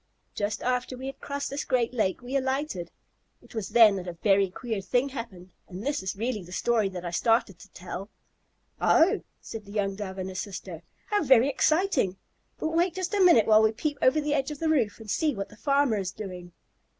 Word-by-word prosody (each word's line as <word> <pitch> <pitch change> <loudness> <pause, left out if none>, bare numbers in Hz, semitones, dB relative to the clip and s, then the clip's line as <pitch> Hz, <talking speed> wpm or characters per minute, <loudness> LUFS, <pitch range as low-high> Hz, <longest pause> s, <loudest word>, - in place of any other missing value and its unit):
Just 205 +1 -2
after 250 0 -1
we 260 - -7
had 270 0 -7
crossed 280 0 -4
this 280 - -2
great 250 -2 0
lake 220 0 0
we 255 +3 -5
alighted. 265 - -1 0.5
It - - -17
was 220 -4 -4
then 220 -4 +6
that 185 -1 -6
a 175 - -4
very 195 +2 +2
queer 220 +2 -4
thing 245 +8 +1
happened, 220 -9 -8 0.2
and 190 +5 -8
this 290 +1 -1
is 190 +1 -3
really 220 +1 -2
the 180 0 -12
story 215 +3 +1
that 180 -2 -7
I 175 - -3
started 225 -1 +1
to 200 - -14
tell." 185 +2 -7 0.7
"Oh!" 380 +6 +4 0.2
said 220 -2 -8
the 200 - -12
young 200 -2 -1
Dove 195 -1 -6
and 190 0 -4
his 185 -1 -4
sister. 185 -4 -7 0.2
"How 415 -1 0
very 265 -2 +5
exciting. 295 - +1 0.4
But 315 - -2
wait 340 +2 +1
just 370 +1 -3
a 405 - +2
minute 340 - +6
while 215 0 +6
we 220 0 +3
peep 290 +4 -3
over 260 +4 +4
the 295 -1 -1
edge 275 -1 0
of 300 - -6
the 320 +2 -1
roof 240 -10 +1
and 220 - -11
see 300 +6 0
what 195 - -4
the - - -15
farmer 275 -1 +2
is 190 -3 -2
doing." 180 -3 -8
225 Hz, 220 wpm, -27 LUFS, 195-280 Hz, 0.7 s, then